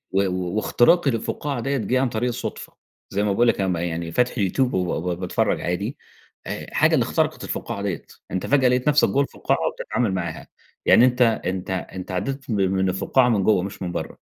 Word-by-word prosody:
و 95 - +3 0.3
واختراقي 140 +8 +3
للفُقَّاعة 125 +3 -3
ديَّة 135 +3 -1
جِه 125 +4 0
عن 135 - +2
طريق 120 +1 -1
الصدفة، 120 - -5 0.4
زي 100 +1 0
ما 105 -1 +1
باقول 120 +4 +3
لك - - +2
أنا 95 - +1
م 90 - 0
يعني 85 -1 -3
فاتح 125 +5 +2
اليوتيوب 125 +6 +1
وبا 90 -1 0
با 90 +2 -2
باتفرّج 90 0 -1
عادي، - - -2 0.5
آآ، - - -5
حاجة - - +4
اللي - - +4
اخترقت - - -1
الفُقَّاعة 100 - -4
ديَّة، 100 -4 -3 0.3
أنت 95 - -2
فجأة 135 -3 +4
لقيت 125 +3 +1
نفسك 150 0 +4
جوّه 140 - +2
الفُقَّاعة، 140 - -1
وبتتعامل 115 -5 -2
معاها 85 -3 -4 0.4
يعني، 120 - +7
أنت 125 0 +3
أنت 95 -5 0
أنت 95 0 -5
عدّيت 125 +9 -3
من 100 -3 +1
من 95 0 +1
الفُقَّاعة 120 +7 +2
من 105 -5 +2
جوّه 105 -4 +3
مش 100 0 -6
من 90 -1 -3
برّه. - - -5
105 Hz, 200 wpm, -23 LUFS, 95-125 Hz, 0.5 s, يعني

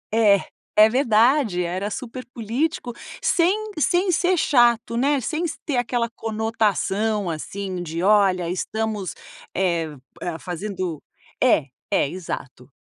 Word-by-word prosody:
É, 205 -4 +5 0.3
é 215 +1 +8
verdade, 235 -4 +3
era 185 +4 -2
super 250 +3 -6
político, 245 +3 -2 0.3
sem 390 +4 +1
sem 360 +4 +2
ser 355 +2 +2
chato, 240 -5 +3
né? 275 +3 +2
Sem 310 +8 -2
s 335 - -3
ter 285 -5 0
aquela 245 -1 0
conotação 215 -3 0
assim 185 +3 -5
de: 165 +1 -4
"Olha, 195 -4 +4
estamos, 210 0 -2 0.4
eh, 170 -4 +1 0.5
fazendo" 180 -3 -4 0.4
É, 225 - +4 0.2
é - - +2
exato. 140 -6 -7
220 Hz, 115 wpm, -23 LUFS, 185-255 Hz, 0.5 s, é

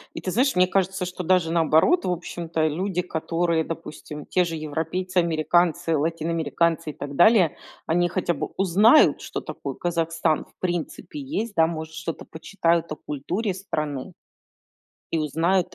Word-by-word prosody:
И - - -4
ты 185 - -3
знаешь, 260 +4 +2
мне 180 0 +5
кажется, 190 0 0
что 180 0 -5
даже 175 -2 +2
наоборот, 165 - +3
в 180 - +1
общем-то 170 -2 -2
люди, 180 +3 -1
которые, 165 -1 0
допустим, 155 -2 -7
те 180 - +2
же 165 -1 -4
европейцы, 160 +5 -3
американцы, 170 0 +2
латиноамериканцы 165 +1 0
и 150 - -5
так 140 -1 -7
далее, 185 -4 +5 0.3
они 175 +2 +2
хотя 175 -1 0
бы - - -3
узнают, 200 - +5
что - - -5
такое - - -6
Казахстан 165 -2 0
в - - -30
принципе 175 - -4
есть, 235 -6 -3
да, 160 -1 +5
может, 160 -1 -5
что-то 165 0 -5
почитают 170 0 -1
о - - -2
культуре 180 +10 -3
страны 155 -8 -4 1.0
...и 165 - +2
узнают 165 +5 +1
170 Hz, 150 wpm, -24 LUFS, 160-185 Hz, 1.0 s, мне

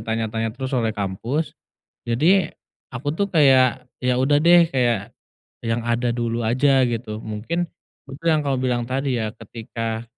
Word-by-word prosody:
tanya-tanya 115 0 -2
terus 130 0 -4
oleh 120 -3 +1
kampus, 115 +10 -2 0.6
jadi 165 +11 +2 0.4
aku 145 +4 -3
tuh 200 +4 -1
kayak 130 -4 +4 0.2
ya 125 -1 +1
udah 145 +2 +3
deh 170 +1 +7
kayak 120 -4 0 0.5
yang 115 +1 -1
ada 120 +1 0
dulu 120 -1 -2
aja 130 +4 +3
gitu. 110 -2 -4
Mungkin 120 +12 -3 0.4
betul 145 +5 -9
yang 155 - +2
kamu 135 -2 0
bilang 120 -2 0
tadi 130 0 -1
ya, 110 - -1
ketika 115 0 -5
125 Hz, 145 wpm, -22 LUFS, 115-140 Hz, 0.6 s, deh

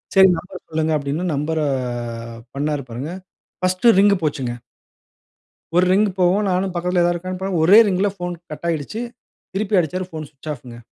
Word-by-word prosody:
"சரி, 190 0 +8
நம்பர 185 +3 -10
சொல்லுங்க" 160 0 0
அப்டின்னு 150 +5 -2
நம்பர 155 +3 -1 1.0
பண்னாரு 145 -1 -1
பாருங்க. 135 +8 -5 0.5
பர்ஸ்ட் 185 +5 +3
ரிங் 200 0 +5
போச்சுங்க. 135 -5 -1 1.2
ஒரு 180 - +6
ரிங்கு 205 +2 +3
போகும். 185 +4 +3
நானும் 185 +1 0
பக்கத்தில 180 0 +1
ஏதாது 175 0 +2
இருக்கானு 185 +2 -5
பா 190 - -1
ஒரே 195 +7 +8
ரிங்ல 195 +1 +1
போன் 175 0 -4 0.2
கட் 150 +3 -6
ஆகிடுச்சு. 165 - -2 0.5
திருப்பி 200 0 +1
அடிச்சாரு, 180 +3 -3
போன் 155 -1 -5
ஸ்விட்ச் 150 +1 -9
ஆஃங்க. 120 -3 -12
175 Hz, 155 wpm, -21 LUFS, 150-185 Hz, 1.2 s, சரி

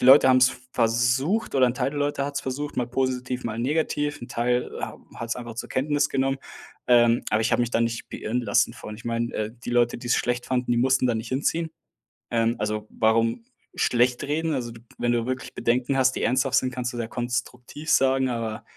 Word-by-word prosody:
die - - -1
Leute 130 +1 +8
haben 130 - +6
es 130 0 +6 0.2
versucht, 125 - +1
oder 130 - +5
ein 120 - 0
Teil 130 +1 0
der 145 - -5
Leute 145 -1 0
hat 145 0 -5
es - - 0
versucht, 145 +3 -4
mal 125 - 0
positiv, 130 0 -2
mal 115 -1 -3
negativ. 145 +2 -1
'N 120 - -7
Teil, 125 +1 0
äh, - - -6
hab - - -10 0.2
hat 115 0 -6
es - - +1
einfach 120 -2 -8
zur - - -5
Kenntnis 145 +2 +1
genommen, 135 0 0 0.5
ähm, 120 -1 +4
aber 110 - +2
ich 110 - +1
habe - - +3
mich 120 -1 0
da - - +2
nicht 115 0 -2
beirren 120 +3 -2
lassen 105 -4 +2
von. 105 - -9
Ich 110 - -13
meine, 115 0 -2
äh, 110 0 -2
die - - -3
Leute, 120 -1 +2
die 120 - -9
es 120 - +3
schlecht 120 0 -1
fanden, 125 -1 -1
die 120 - +3
mussten 130 +1 +3
da 120 - +1
nicht 110 +1 -5
hinziehen. 160 +5 0 0.6
Ähm, 115 0 +2
also, 105 0 -2
warum 115 - +1 0.3
schlecht 125 0 +2
reden? 160 +2 -1
Also, 120 -4 -3
du 115 - -12 0.2
wenn 120 - +1
du 120 -1 +1
wirklich 130 0 -4
Bedenken 125 +3 0
hast, 130 0 +4
die - - -3
ernsthaft 130 +2 +2
sind, 130 -1 +1
kannst 125 0 -3
du - - -6
sie 120 - -1
ja - - -5
konstruktiv 125 +4 -4
sagen, 130 -1 +3
aber 115 -3 -3
125 Hz, 235 wpm, -25 LUFS, 115-135 Hz, 0.6 s, Leute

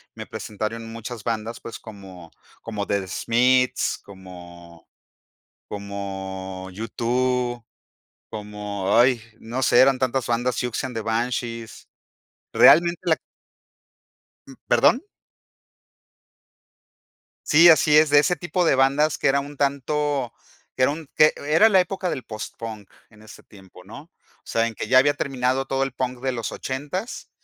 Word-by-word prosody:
me - - -7
presentaron 115 +2 -5
muchas 115 -1 -8
bandas, 115 0 -3
pues 115 - -9
como 95 -6 -12 0.3
como 105 -3 -4
The 100 -2 -2
Smiths, 125 +5 +1
como 85 -3 -13 0.8
como 95 -2 -6
U2, 120 +3 -1 0.7
como, 105 -2 -3
ay, 120 0 +4 0.2
no 120 +4 -4
sé, 120 - +4
eran 135 -1 +5
tantas 130 0 -1
bandas, 120 +1 0
Siouxsie 125 +2 -2
And 125 -3 -8
The 110 - -2
Banshees. 115 0 -3 0.7
Realmente 170 +1 +6
la 165 -3 +2 1.3
Mm, - - -11
¿perdón? 265 +8 +4 2.4
Sí, 165 +3 +7
así 155 -2 +5
es, 155 -1 +5
de 145 - +6
ese 175 +4 +2
tipo 175 +2 -1
de 140 - +4
bandas 140 +3 +2
que - - 0
era 140 +1 +3
un 145 +1 -8
tanto 140 -2 -1 0.4
que 130 - +1
era 140 - +4
un 155 0 -7
que 155 0 +5
era 160 +9 +4
la 190 -3 +5
época 185 0 -3
del 130 -4 -4
postpunk 110 -1 -8 0.2
en 110 -1 -20
ese 110 - -14
tiempo, 95 -3 -17
¿no? 115 +9 -11
O 170 - -29 0.4
sea, 115 0 +1
en 115 - -7
que - - -5
ya 130 +2 +5
había 145 +2 +3
terminado 135 -1 -1
todo 135 0 -1
el 135 - -3
punk 125 -1 -4
de 130 - -1
los 115 -3 -4
ochentas, 145 - -5
120 Hz, 140 wpm, -23 LUFS, 105-140 Hz, 2.4 s, Sí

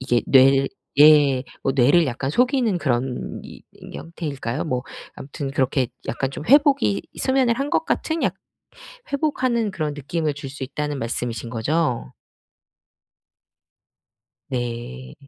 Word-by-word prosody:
이게 120 -2 +1
뇌를 135 0 +5 0.3
예 145 -4 +6 0.2
뭐 135 - +1
뇌를 145 +6 +4
약간 130 +1 -3
속이는 245 - +2
그런 130 -3 -2
이 - - -12 0.3
형태일까요. 145 -6 -5
뭐 125 -5 -2 0.3
아무튼 140 0 -6
그렇게 130 -1 +1 0.2
약간 130 +4 -2
좀 150 - -7
회복이 270 - +4 0.2
수면을 260 -3 +2
한 280 +1 -2
것 - - +1
같은 320 +1 -1
약 - - +1 0.8
회복하는 255 -6 0
그런 155 -4 -2
느낌을 150 +2 -2
줄 140 -1 -7
수 140 0 -9
있다는 145 +1 -4
말씀이신 115 0 -3
거죠? 125 - -1 2.4
네. 120 - -5
140 Hz, 245 characters per minute, -22 LUFS, 125-170 Hz, 2.4 s, 예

